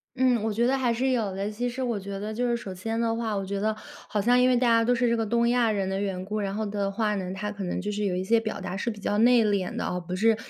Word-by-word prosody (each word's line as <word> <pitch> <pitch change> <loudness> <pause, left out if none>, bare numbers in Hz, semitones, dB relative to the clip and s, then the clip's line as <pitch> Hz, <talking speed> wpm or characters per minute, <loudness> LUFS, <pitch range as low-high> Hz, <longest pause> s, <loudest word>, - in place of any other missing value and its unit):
嗯， 250 -3 +3
我 220 - 0
觉 230 +3 +1
得 260 +2 +3
还 250 -3 +1
是 260 +3 +1
有 215 -6 0
的。 200 +1 -2
其 245 +3 -2
实 260 +2 -4
我 235 -4 -1
觉 200 0 -6
得 215 +1 -4
就 245 +3 0
是 235 0 +1
首 195 -5 -7
先 225 +5 -3
的 230 -1 +1
话， 225 -2 -2
我 195 - -2
觉 200 +1 -3
得 215 +2 +1 0.4
好 210 - -1
像 245 +4 +4
因 250 - +5
为 250 - +4
大 245 0 +2
家 230 -1 +4
都 245 +2 +3
是 245 0 +2
这 235 - +2
个 225 - 0
东 235 +2 +2
亚 240 -2 +3
人 195 -2 -1
的 190 0 -1
缘 190 -2 -2
故， 210 +2 -3
然 195 -1 -2
后 220 - -2
的 200 -1 -2
话 210 +1 0
呢， 185 -2 -3
他 210 +2 -4
可 205 -1 -6
能 180 - -2
就 205 +3 -3
是 210 0 -2
有 185 -2 0
一 185 - -1
些 230 +4 +3
表 220 -2 -4
达 190 -1 -5
是 195 +4 -2
比 215 -2 -6
较 205 +1 -1
内 235 -1 +5
敛 200 -3 0
的 - - -2
啊， 180 - -2
不 180 +1 -5
是 220 +3 +3
215 Hz, 355 characters per minute, -26 LUFS, 195-235 Hz, 0.4 s, 因